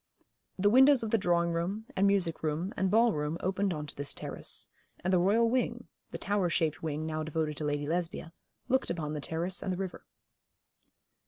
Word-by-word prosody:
The 205 +2 +3
windows 265 +1 +6
of 220 - -3
the 225 - +3
drawing 170 -2 +2
room, 180 +6 -2
and 195 +1 +3
music 190 -5 +2
room, 160 +5 -2
and 190 - +1
ballroom 180 -8 +2
opened 195 +1 0
on 150 -3 -3
to 145 - -9
this 140 0 -3
terrace, - - -4 0.4
and 185 +2 +1
the 180 - +5
royal 210 +6 +4
wing 250 +2 -1 0.2
the - - -6
tower 200 -3 0
shaped 160 -2 0
wing 155 -1 -3
now 155 0 -2
devoted 155 -1 -2
to 155 - -3
Lady 145 0 -1
Lesbia, 170 +1 -3 0.3
looked 260 +1 +1
upon 155 -3 -3
the 150 - -4
terrace 170 +5 0
and 190 - -2
the 180 - -2
river. 190 -1 -6
175 Hz, 190 wpm, -30 LUFS, 155-200 Hz, 0.4 s, windows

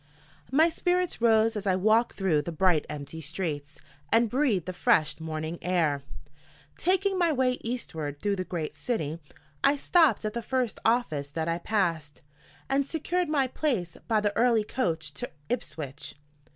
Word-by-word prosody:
MY 315 +5 +5
spirits 355 -2 0
rose 225 -1 +4
as 205 -1 -3
I 185 - +3
walked 220 +5 +3
through 180 -7 +2
the 170 - -5
bright 170 -1 +2
empty 150 +2 -6
streets, 145 -2 -4 0.3
and 225 -1 +4
breathed 245 - +1
the 185 - -4
fresh 160 -3 +2
morning 160 +1 -4
air. 165 -6 +1 0.7
Taking 380 +1 +1
my 340 -2 +3
way 255 -3 +1
eastward 160 - -4
through 200 +3 0
the 185 - -1
great 160 -4 -4
city, 155 -1 -2 0.4
I 280 - +5
stopped 290 - +3
at 210 - -2
the 235 - -2
first 250 -2 -1
office 165 - +1
that 160 +2 -3
I 165 +1 0
passed, 170 -8 -1 0.4
and 275 +1 +2
secured 345 +2 -1
my 285 -3 +2
place 245 - -1
by 220 -2 +3
the 205 -1 0
early 230 -2 +4
coach 160 - -2
to 140 - -5 0.2
Ipswich. 155 - -4
200 Hz, 160 wpm, -28 LUFS, 160-250 Hz, 0.7 s, MY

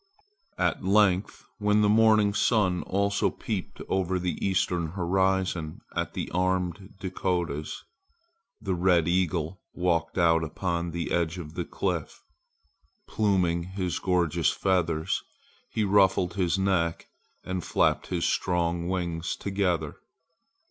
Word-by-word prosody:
At - - 0
length 100 -1 +2
when 105 0 +3
the 105 - +4
morning 110 -1 +4
sun 100 -5 +2
also 100 +1 +1
peeped 105 -5 -5
over 95 -1 0
the 90 0 -3
eastern 90 -4 0
horizon 95 -3 0
at - - -2
the - - -4
armed 90 +1 -1
Dakotas, 90 -5 -2 0.8
the 95 -4 -2
red 90 -2 +3
eagle 90 -1 0
walked 85 -2 0
out 80 -2 +4
upon 85 +2 -2
the 85 0 -4
edge 85 0 0
of 80 -3 -8
the - - -3
cliff. - - -3 0.8
Pluming 90 -5 +1
his 90 0 -3
gorgeous 85 -4 +1
feathers, 85 -4 0 0.5
he 110 - -1
ruffled 95 -3 +3
his 90 -2 +1
neck 95 -4 0 0.4
and 95 -2 -3
flapped - - +1
his 85 -2 -1
strong 85 -1 0
wings 85 -3 -2
together. 90 -6 -1
90 Hz, 120 wpm, -27 LUFS, 85-95 Hz, 0.8 s, the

